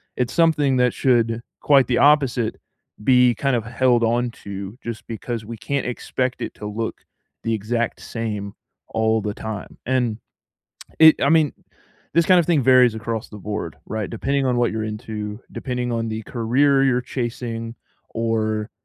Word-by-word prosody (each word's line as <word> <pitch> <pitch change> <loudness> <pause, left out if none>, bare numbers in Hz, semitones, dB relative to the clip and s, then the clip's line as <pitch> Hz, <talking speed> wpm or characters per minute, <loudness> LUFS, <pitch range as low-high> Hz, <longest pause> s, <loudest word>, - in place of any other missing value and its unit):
It's 125 -1 -1
something 150 -5 +3
that 125 -1 +3
should, 115 -3 +2 0.2
quite 140 -4 +4
the 120 - +1
opposite, 135 -6 +3 0.5
be 125 -1 +5
kind 135 +4 0
of 115 -2 -2
held 120 0 +2
onto 115 -4 -2
just 115 -1 -6
because 115 0 -5
we 115 0 -7
can't 130 +6 -2
expect 125 +1 -2
it - - -5
to 105 - -7
look 110 +2 -4 0.4
the 115 - 0
exact 115 +2 -2
same 105 -3 -4 0.4
all 110 0 +1
the 105 0 -3
time. 110 -1 -7
And 125 -4 0 0.8
it 160 -1 +7
I 140 - +3
mean, 160 -2 +4 0.6
this 170 0 +4
kind 185 -2 +6
of 160 - -2
thing 160 -6 +3
varies 125 -3 +5
across 110 0 -4
the 105 - -10
board, 105 +1 -5
right? 110 -2 -3
Depending 135 +4 -1
on 125 -1 +1
what 120 -2 +2
you're 110 0 -2
into, 105 -1 -5
depending 125 -2 -3
on 115 -1 -1
the 110 0 -4
career 135 +5 +2
you're 130 -2 +3
chasing, 120 -2 -4 0.3
or 110 -1 -1
120 Hz, 160 wpm, -22 LUFS, 110-130 Hz, 0.8 s, it